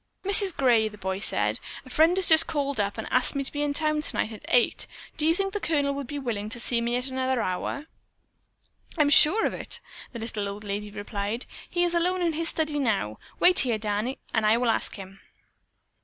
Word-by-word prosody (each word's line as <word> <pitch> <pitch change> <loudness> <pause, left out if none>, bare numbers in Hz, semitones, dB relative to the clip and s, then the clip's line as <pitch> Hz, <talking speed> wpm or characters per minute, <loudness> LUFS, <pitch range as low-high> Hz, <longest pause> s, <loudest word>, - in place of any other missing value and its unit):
"Mrs. 395 -2 +6
Gray," 235 -5 +3
the 210 - -14
boy 190 -1 -3
said, 210 - 0 0.3
"a - - -13
friend 325 +6 +3
has 380 - +2
just 320 0 +5
called 280 -4 -2
up 200 +1 -1
and 220 - -5
asked 255 +2 +2
me 275 - -1
to - - -2
be 290 - -3
in 295 -1 0
town 305 +1 +1
tonight 230 - -2
at 215 - -10
eight. 245 -1 +3 0.3
Do 310 0 0
you 325 - +3
think 390 +1 -2
the 415 - -2
Colonel 290 -6 0
would 280 -2 -5
be 290 - -5
willing 220 -6 -4
to 240 - -6
see 235 0 0
me 235 +1 -1
at 250 +1 -1
another 260 -1 -1
hour?" 225 +9 -3 1.1
"I'm 295 -2 +3
sure 345 +10 +6
of - - -1
it," - - -2 0.3
the 235 - -8
little 220 -3 -4
old 205 +1 -8
lady 205 +1 -4
replied. 205 +2 -5 0.2
"He 350 0 0
is 350 -1 +1
alone 355 +1 +1
in 335 -2 +1
his 330 +2 0
study 310 -2 0
now. 200 - -1 0.2
Wait 360 0 +6
here. 240 -4 +1
Danny, 215 +4 -2 0.2
and 225 - +2
I 215 +2 +4
will 240 -1 +2
ask - - 0
him." 195 -1 -11
255 Hz, 220 wpm, -26 LUFS, 215-310 Hz, 1.1 s, Mrs